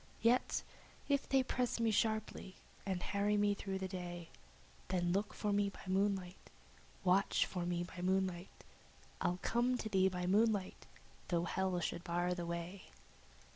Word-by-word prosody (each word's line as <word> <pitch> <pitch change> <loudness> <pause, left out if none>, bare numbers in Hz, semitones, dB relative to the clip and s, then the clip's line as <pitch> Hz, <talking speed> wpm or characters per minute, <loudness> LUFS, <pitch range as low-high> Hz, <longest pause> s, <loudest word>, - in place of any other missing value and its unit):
Yet 240 +2 +3 0.4
if 280 -1 +1
they 270 -1 +4
press 250 -2 -1
me 230 -1 +3
sharply, 220 -3 0 0.3
and 185 -2 -1
harry 205 +1 +1
me 205 0 +3
through 195 -1 -3
the 190 0 -3
day, 175 -2 -6 0.6
Then 175 -2 +1
look 200 +3 0
for 210 -1 -1
me 200 0 +2
by - - -12
moonlight, 190 -1 -1 0.5
Watch 190 +1 +3
for 175 -2 -3
me 175 0 0
by 175 0 -8
moonlight, 185 -1 -1 0.6
I'll 180 - +1
come 245 +2 +2
to 220 - -4
thee 190 -2 +4
by 180 -1 -3
moonlight, 205 0 +2 0.4
though 170 -1 +1
hell 185 0 0
should 170 - -2
bar 175 0 0
the 175 -1 -4
way." 170 +3 -5
190 Hz, 155 wpm, -37 LUFS, 180-205 Hz, 0.6 s, they